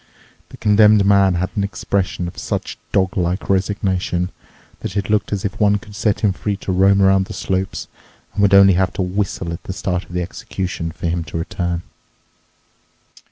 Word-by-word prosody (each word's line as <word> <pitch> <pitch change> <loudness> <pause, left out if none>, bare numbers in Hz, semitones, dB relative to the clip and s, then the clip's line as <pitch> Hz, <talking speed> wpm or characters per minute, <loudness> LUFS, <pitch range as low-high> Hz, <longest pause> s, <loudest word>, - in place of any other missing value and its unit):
The - - -12
Condemned 105 -1 +5
Man 100 -2 +4
had 90 +1 -1
an 100 - 0
expression 95 -2 -2
of 90 - -8
such - - -4
dog 95 -2 +1
like 90 +2 -1
resignation 95 -2 0 0.5
that 95 - -5
it 100 +1 -1
looked 105 - +1
as 100 -2 -2
if 100 +1 -3
one 105 -1 +4
could 105 -1 -13
set 105 -1 0
him 105 -3 +3
free 100 +1 -3
to 95 - -4
roam 95 +1 +4
around 95 0 +4
the - - -7
slopes 95 0 -2 0.5
and 100 - -1
would 100 -1 +5
only 100 0 +8
have 95 +1 +1
to 95 - -1
whistle 90 -2 -2
at 85 - -7
the 95 - -4
start 90 -1 -2
of 90 - -14
the 90 0 -1
execution 90 -1 -4
for 85 - -8
him 85 0 0
to - - -5
return. 85 +1 -3
95 Hz, 190 wpm, -19 LUFS, 90-100 Hz, 0.5 s, only